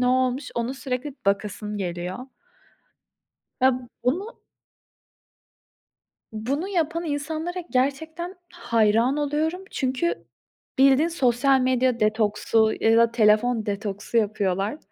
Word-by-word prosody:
ne 250 - +2
olmuş, 255 +1 +1
onu 235 +3 -2
sürekli 265 +1 -4
bakasım 210 +1 -1
geliyor. 180 0 -4 1.4
Ya, 260 +1 +5 0.3
bunu 370 - -1 1.9
bunu 275 - -2
yapan 340 -2 -1
insanlara 315 +4 -3
gerçekten 315 +7 -1 0.2
hayran 230 -4 +2
oluyorum. 310 +5 -1
Çünkü 265 +5 -1 0.5
bildiğin 275 +4 +5
sosyal 270 -4 +2
medya 255 -1 +1
detoksu 215 +1 +2
ya 225 0 +4
da 230 0 +4
telefon 220 0 +3
detoksu 205 +2 -3
yapıyorlar. 205 +2 0
255 Hz, 95 wpm, -24 LUFS, 215-295 Hz, 1.9 s, Ya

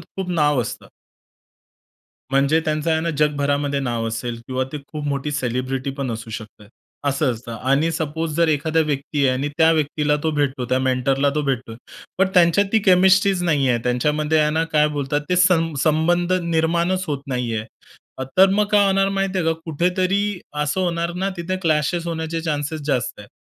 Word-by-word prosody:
खूप 185 +3 -7
नाव 150 -5 +2
असतं. - - -7 1.4
म्हणजे 140 +4 +3
त्यांचं 155 +1 -1
आहे 160 - +2
ना, 170 +1 -1
जगभरामध्ये 145 -1 +1
नाव 120 -3 -2
असेल 115 +1 -4
किंवा 130 0 -1
ते 150 - -4
खूप 150 -1 -6
मोठी 140 +1 -2
सेलिब्रिटी 130 0 -2
पण 135 -3 -3
असू 115 0 -6
शकतात, 105 -1 -9 0.4
असं 140 -1 +1
असतं. 115 0 -8
आणि 140 +7 +1
सपोज 160 -1 -3
जर 170 -1 +3
एखाद्या 155 +2 +1
व्यक्ती 145 -1 -3
आहे - - +4
आणि 140 +2 -1
त्या 160 0 +6
व्यक्तीला 150 -1 +1
तो 160 - +1
भेटतो, 140 -4 -1
त्या 130 - +2
मेंटरला 130 +2 +1
तो 150 - 0
भेटतोय. 130 -5 -3 0.4
पण 195 - +3
त्यांच्यात 180 +3 +4
ती 225 - +5
केमिस्ट्रीच 190 0 +4
नाहीये, 140 -8 +2
त्यांच्यामध्ये 150 +5 +1
आहे 150 - +2
ना 160 +2 +1
काय 150 -1 +4
बोलतात, 145 -1 -2
ते 180 - +1
सं 175 -3 +3
संबंध 175 +3 +2
निर्माणच 170 +3 0
होत 145 -3 -3
नाहीये. 120 -4 -2 0.7
तर 190 +1 +7
मग 210 +1 +2
काय 205 -1 +5
होणार 195 0 +2
माहिती 195 -1 -1
आहे 165 - -1
का, 165 - +3
कुठेतरी 185 +4 0 0.2
असं 150 +6 -1
होणार 170 -1 -1
ना, 190 +2 -1
तिथे 175 +2 -3
क्लॅशेस 165 +2 0
होण्याचे 165 0 -3
चान्सेस 155 -1 -3
जास्त 125 -7 -1
आहेत. 100 - -13
150 Hz, 175 wpm, -21 LUFS, 135-170 Hz, 1.4 s, तर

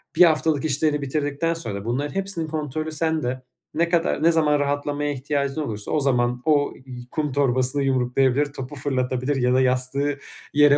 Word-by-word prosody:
1 - - +7
haftalık 160 -2 +2
işlerini 150 +1 +1
bitirdikten 145 +3 -1
sonra. 105 -11 -4
Bunlar 135 +5 -1
hepsinin 195 -4 -2
kontrolü 155 0 -3
sende. 155 -5 -1 0.3
Ne 170 +1 +1
kadar 170 -2 +1
ne 170 - +6
zaman 150 -3 +3
rahatlamaya 145 +1 -1
ihtiyacın 140 +2 -2
olursa 110 -7 -4
o 155 - +2
zaman 125 -3 +1
o 145 -2 +2
y 125 -2 -8
kum 150 -3 -1
torbasını 130 0 +1
yumruklayabilir, 130 +1 +2
topu 135 +2 -7
fırlatabilir 130 0 -1
ya 125 -1 +2
da 130 - +4
yastığı 130 +3 0 0.3
yere 145 0 +6
145 Hz, 160 wpm, -23 LUFS, 130-155 Hz, 0.3 s, 1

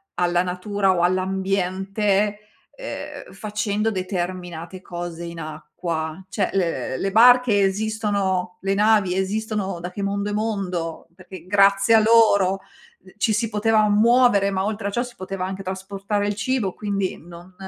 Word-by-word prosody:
alla 175 0 +2
natura 185 +2 0
o 175 - 0
all'ambiente, 195 +2 0 0.4
ehm, - - -8
facendo 210 0 -2
determinate 180 -2 -4
cose 175 -2 -6
in 170 0 -7
acqua. 160 +2 -5
Cioè, 195 -2 -1
le 170 -8 -1
le 195 - -2
barche 245 -1 +6
esistono 195 -3 -1
le 195 0 0
navi 210 -2 +3
esistono 200 -1 -2
da 175 +1 -6
che 200 - -6
mondo 200 +1 -1
e 205 - -3
mondo, 195 -6 -3
perché 185 -1 -12
grazie 200 +2 +4
a 225 - +8
loro 210 -4 +4 0.4
d 190 - -19
ci 215 - +1
si 225 +2 +1
poteva 215 0 +2
muovere, 215 -1 +4
ma 190 0 -1
oltre 210 -1 -3
a - - -2
ciò 240 +4 0
si 245 -1 -10
poteva 185 0 -5
anche 190 +1 -5
trasportare 195 +2 -3
il 205 - 0
cibo 210 -3 -1
quindi 200 -3 -2
non 175 +2 -13
195 Hz, 150 wpm, -22 LUFS, 185-210 Hz, 0.4 s, a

